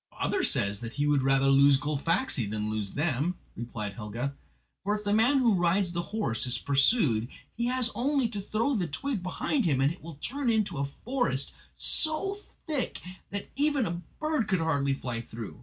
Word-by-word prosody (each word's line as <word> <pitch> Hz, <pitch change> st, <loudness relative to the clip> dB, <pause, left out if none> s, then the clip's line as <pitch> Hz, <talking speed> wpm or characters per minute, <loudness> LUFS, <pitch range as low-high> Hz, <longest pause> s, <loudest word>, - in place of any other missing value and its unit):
"Bather -, -, +1 dB
says 100 Hz, 0 st, +2 dB
that 115 Hz, -1 st, -7 dB
he 145 Hz, -, +1 dB
would 145 Hz, -2 st, +3 dB
rather 135 Hz, 0 st, +3 dB
lose 135 Hz, 0 st, +6 dB
Gullfaxi 150 Hz, -, 0 dB
than 105 Hz, 0 st, -2 dB
lose 105 Hz, -2 st, -3 dB
them," 155 Hz, +3 st, 0 dB, 0.2 s
replied 110 Hz, -4 st, -5 dB
Helga, 115 Hz, +6 st, -4 dB, 0.5 s
"for 205 Hz, +2 st, +1 dB
if 210 Hz, -, -5 dB
the 205 Hz, 0 st, +1 dB
man 235 Hz, +6 st, +4 dB
who 240 Hz, -4 st, +4 dB
rides 180 Hz, +1 st, +2 dB
the 170 Hz, 0 st, -1 dB
horse 170 Hz, -, -2 dB
is 125 Hz, -1 st, 0 dB
pursued 140 Hz, -, +3 dB, 0.3 s
he 235 Hz, +1 st, -1 dB
has 250 Hz, -1 st, +3 dB
only 270 Hz, 0 st, +1 dB
to 205 Hz, -3 st, -4 dB
throw 225 Hz, +7 st, 0 dB
the 190 Hz, -8 st, 0 dB
twig 215 Hz, -, -3 dB
behind 225 Hz, +8 st, -1 dB
him 140 Hz, -6 st, +2 dB
and 135 Hz, +2 st, +3 dB
it 180 Hz, -, -17 dB
will 165 Hz, -1 st, -9 dB
turn 255 Hz, -, -2 dB
into 210 Hz, -9 st, +1 dB
a 140 Hz, -, +1 dB, 0.2 s
forest, 245 Hz, -, 0 dB, 0.2 s
so 315 Hz, +5 st, +1 dB, 0.3 s
thick 300 Hz, -5 st, -1 dB, 0.3 s
that 200 Hz, 0 st, -5 dB
even 285 Hz, -3 st, +2 dB
a 170 Hz, 0 st, -3 dB, 0.2 s
bird 305 Hz, -8 st, 0 dB
could 190 Hz, -, +2 dB
hardly 140 Hz, -4 st, +1 dB
fly 120 Hz, -4 st, -4 dB
through. 115 Hz, -2 st, -8 dB
170 Hz, 190 wpm, -29 LUFS, -, 0.5 s, lose